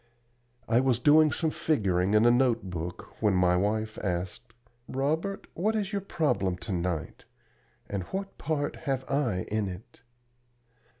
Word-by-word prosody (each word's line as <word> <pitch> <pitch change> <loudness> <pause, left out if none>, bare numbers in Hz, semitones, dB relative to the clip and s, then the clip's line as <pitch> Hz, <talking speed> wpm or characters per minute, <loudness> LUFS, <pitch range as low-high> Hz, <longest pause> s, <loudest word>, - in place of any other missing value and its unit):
I 115 +1 +4
was 130 -3 +2
doing 150 +4 +5
some 160 -2 0
figuring 100 - +1
in 105 +2 +5
a 120 - +7
note 120 -6 +2
book 90 +1 -7
when 105 -3 +3
my 90 -1 +4
wife 110 +3 -1
asked: 95 +5 -3 0.4
"Robert, 160 +9 -1
what 215 +6 0
is 205 -3 -1
your 200 - 0
problem 150 - 0
to 95 - -5
night? 85 -3 -3 0.6
And 100 -2 -3
what 195 - -5
part 145 -2 -2
have 135 -1 0
I 125 -10 0
in 105 -1 0
it?" 95 +5 -9
115 Hz, 145 wpm, -28 LUFS, 95-150 Hz, 0.6 s, a